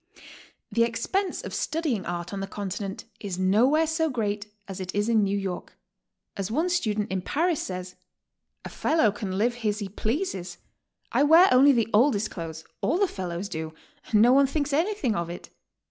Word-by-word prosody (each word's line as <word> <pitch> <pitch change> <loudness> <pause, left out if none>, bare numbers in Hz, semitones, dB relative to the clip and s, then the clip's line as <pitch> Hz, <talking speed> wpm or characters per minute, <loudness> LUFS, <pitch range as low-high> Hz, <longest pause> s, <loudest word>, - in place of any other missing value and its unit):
The 230 - +3
expense 235 - -1
of - - -6
studying 305 - -1
art 175 +1 -4
on 200 - -3
the 195 - -3
Continent 195 0 -5
is 195 -4 -5
no 195 +6 +4
where 310 +3 +3
so 320 0 0
great 210 -5 -2 0.2
as 195 -1 -7
it 185 0 -5
is 205 +1 +1
in 230 -2 +4
New 200 0 0
York. 190 -3 -5 0.6
As 195 0 -3
one 320 +10 0
student 215 - 0
in 190 -1 -1
Paris 325 - 0
says: 185 0 -6 0.7
"A - - -5
fellow 310 -10 +2
can 195 -2 -4
live 240 +4 +1
as 210 -1 +1
he 205 -2 -5
pleases. 200 - -3 0.5
I - - +2
wear 325 +6 +7
only 270 +3 +7
the 230 -3 +1
oldest 220 -2 +3
clothes, 160 -2 -6
— - - -49
all - - +1
the 400 0 +3
fellows 185 - -4
do, 160 -3 -5 0.3
and 215 -1 +5
no 245 +2 +6
one 275 0 +5
thinks 285 +1 -2
anything 325 - +1
of 170 -2 -2
it. 175 - -8
210 Hz, 190 wpm, -26 LUFS, 190-285 Hz, 0.7 s, wear